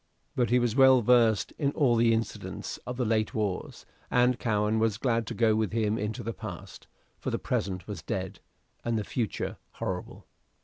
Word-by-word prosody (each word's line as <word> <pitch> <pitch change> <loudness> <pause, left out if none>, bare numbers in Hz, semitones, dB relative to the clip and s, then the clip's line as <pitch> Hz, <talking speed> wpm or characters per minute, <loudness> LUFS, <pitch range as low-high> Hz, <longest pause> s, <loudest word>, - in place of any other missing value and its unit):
But 120 -2 +1
he 125 - +4
was 120 -2 +1
well 130 -2 +6
versed 115 -3 +4
in 140 -3 +1
all 130 -6 +3
the 115 0 +4
incidents 115 -1 -3
of 125 0 -4
the 125 - 0
late 110 -1 0
wars, 105 -4 -3 0.2
and 125 0 +3
Cowen 105 -1 +1
was 110 -2 +1
glad 115 -2 0
to - - -4
go 115 -2 +3
with 110 -3 0
him 110 -1 +1
into 105 +1 -3
the 115 +2 -3
past; 100 -5 -9 0.3
for - - -3
the - - -1
present 95 -2 -2
was 100 -6 -6
dead, 95 +3 -4 0.4
and 115 -1 0
the 105 - -1
future 115 0 -3 0.2
horrible. 90 -1 -5
110 Hz, 185 wpm, -28 LUFS, 105-120 Hz, 0.4 s, well